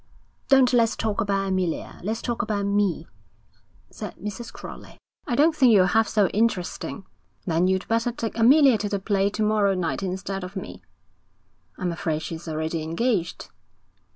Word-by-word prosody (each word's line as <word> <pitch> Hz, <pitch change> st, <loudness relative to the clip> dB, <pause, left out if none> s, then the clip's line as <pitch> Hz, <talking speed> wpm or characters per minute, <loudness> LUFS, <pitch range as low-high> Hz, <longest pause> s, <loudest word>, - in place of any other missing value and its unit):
'Don't 265 Hz, -2 st, +5 dB
let's 230 Hz, -2 st, +3 dB
talk 220 Hz, 0 st, -1 dB
about 195 Hz, -2 st, 0 dB
Amelia; 185 Hz, -3 st, -2 dB
let's 220 Hz, +5 st, -3 dB
talk 240 Hz, -1 st, -1 dB
about 210 Hz, -3 st, -2 dB
me,' 200 Hz, -5 st, 0 dB, 0.9 s
said -, -, -7 dB
Mrs. 210 Hz, +4 st, -7 dB
Crowley. -, -, -11 dB, 0.3 s
'I 245 Hz, -, 0 dB
don't 310 Hz, +4 st, +4 dB
think 255 Hz, -5 st, +5 dB
you're 195 Hz, -4 st, +6 dB
half 220 Hz, +4 st, +2 dB
so 205 Hz, -2 st, +2 dB
interesting.' 210 Hz, -2 st, -1 dB, 0.4 s
'Then 170 Hz, +1 st, +2 dB
you'd 190 Hz, 0 st, 0 dB
better 230 Hz, +2 st, +1 dB
take 230 Hz, -1 st, -5 dB
Amelia 255 Hz, +1 st, +5 dB
to 205 Hz, -, -2 dB
the 200 Hz, -, -1 dB
play 195 Hz, 0 st, +1 dB
to 215 Hz, +1 st, -2 dB
morrow 210 Hz, -2 st, +2 dB
night 175 Hz, -1 st, -2 dB
instead 190 Hz, 0 st, -4 dB
of 185 Hz, +2 st, -8 dB
me.' 190 Hz, -, -7 dB, 1.0 s
'I'm 180 Hz, -2 st, -2 dB
afraid 160 Hz, -2 st, -2 dB
she's 165 Hz, 0 st, -7 dB
already 160 Hz, +1 st, -2 dB
engaged.' 175 Hz, +3 st, -1 dB
200 Hz, 160 wpm, -24 LUFS, 185-225 Hz, 1.0 s, you're